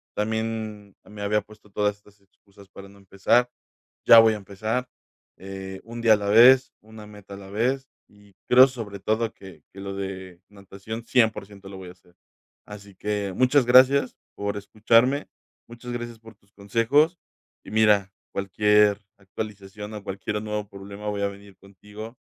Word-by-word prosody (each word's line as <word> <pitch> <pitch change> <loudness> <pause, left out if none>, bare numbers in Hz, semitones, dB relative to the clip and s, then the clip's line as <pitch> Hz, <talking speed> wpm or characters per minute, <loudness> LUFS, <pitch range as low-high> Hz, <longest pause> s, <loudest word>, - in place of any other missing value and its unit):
también 110 -2 -4
me 105 +1 -11
había 105 +1 +1
puesto 105 0 -19
todas 105 0 -1
estas 105 0 -24
excusas 100 0 -22
para 100 0 -12
no 100 - -18
empezar, 100 +5 +1 0.6
ya 115 - +9
voy 115 -1 +5
a - - -4
empezar, 110 +5 -4 0.5
eh, 95 0 -8
1 115 +1 -8
día 115 -1 +6
a - - +3
la 100 -1 -3
vez, 130 +5 +6
1 110 0 -13
meta 105 -1 -13
a - - -10
la 95 -1 -12
vez, 130 +6 -1 0.2
y 105 -1 -22 0.2
creo 130 +2 +8
sobre 110 -6 -8
todo 110 +3 -1
que 90 -7 -14
que 95 - -12
lo 100 0 -6
de 95 -2 -7
natación 100 +3 -9
100% 105 -5 0
lo 95 - -9
voy 95 -1 -10
a - - -12
hacer. 90 -1 -28 0.5
Así 100 -1 -12
que 100 -1 -3
muchas 130 +3 +3
gracias 130 +2 +5 0.2
por 100 0 -3
escucharme, 115 +7 +2 0.4
muchas 120 +1 -9
gracias 120 -1 -6
por 115 0 -15
tus 100 0 -34
consejos, 115 - +1 0.4
y - - -12
mira, 105 -3 +3 0.2
cualquier 105 +1 +2 0.2
actualización 105 +1 -8
o 105 - -8
cualquiera 100 +2 -4
nuevo 105 -1 -4
problema 100 +1 -9
voy 100 -1 -3
a - - +2
venir 100 0 -14
contigo 105 +4 -12
105 Hz, 165 wpm, -24 LUFS, 100-115 Hz, 0.6 s, ya